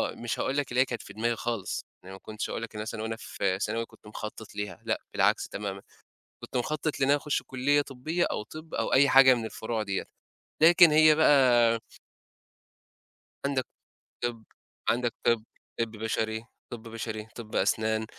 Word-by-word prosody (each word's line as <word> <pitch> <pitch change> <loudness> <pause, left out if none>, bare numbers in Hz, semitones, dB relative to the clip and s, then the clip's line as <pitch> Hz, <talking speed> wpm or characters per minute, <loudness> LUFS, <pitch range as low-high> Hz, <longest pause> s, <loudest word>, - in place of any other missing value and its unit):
مش 120 -1 -4
هاقول 135 +2 -1
لك 140 -4 -1
اللي 125 +1 +3
هي - - +4
كانت 120 - -5
في - - -11
دماغي 115 +2 0
خالص. 115 -5 -3 0.2
يعني 95 +1 -10
ما 95 - -10
كنتش 110 +1 -5
هاقول 115 - -4
لك 115 - -8
مثلًا 110 +1 -4
وأنا 110 0 -3
في 95 -4 -2
ثانوي 115 +2 -1
كنت - - -19
مخطط 110 0 -8
ليها. 105 -1 -5
لأ، - - -1
بالعكس - - +2
تمامًا. 100 -1 -5 0.6
كنت - - -4
مخطط 155 +4 -2
لإن 135 - +2
أنا 145 - +5
أخش 145 0 -2
كُلّية 140 +3 +2
طبية 145 +6 -2
أو - - -3
طِب 155 +7 -11
أو - - -1
أي 140 +2 +6
حاجة 135 -1 +8
من 115 -2 -2
الفروع 110 0 -3
دِيَّة. 100 -2 -2 0.6
لكن 170 0 +8
هي 155 0 +7
بَقى 125 -6 +5 1.7
عَندك 135 -2 0 0.6
طِب، 120 -2 -2 0.5
عَندك 120 0 +1
طِب، 115 -2 +2 0.4
طِب 115 -1 0
بشري، 110 0 -2 0.3
طِب 115 -2 -8
بشري، 110 -1 -5
طِب 110 -2 -8
أسنان، 110 +2 +1
115 Hz, 170 wpm, -28 LUFS, 110-135 Hz, 1.7 s, حاجة